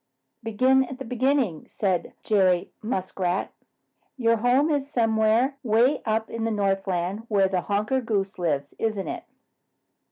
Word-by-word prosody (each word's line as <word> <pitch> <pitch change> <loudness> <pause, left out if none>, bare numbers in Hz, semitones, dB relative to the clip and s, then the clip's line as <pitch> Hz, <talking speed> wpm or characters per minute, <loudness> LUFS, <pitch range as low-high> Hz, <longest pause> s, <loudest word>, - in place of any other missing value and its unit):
"Begin 255 +4 +3
at 260 +1 -8
the 270 - -7
beginning," 250 - 0
said 190 -4 -1
Jerry 185 -4 +2
Muskrat. 190 -4 -2 0.7
"Your 230 -2 +2
home 255 +7 +2
is 285 -1 -1
somewhere 225 +2 +2
way 240 +3 +2
up 220 0 0
in 230 -1 -5
the 225 - 0
Northland 195 -1 -1
where 200 -3 +3
Honker 200 +6 0
the 250 - -8
Goose 200 -3 -1
lives, 145 -5 -1
isn't 215 -4 -1
it?" - - -5
220 Hz, 135 wpm, -25 LUFS, 195-245 Hz, 0.7 s, Begin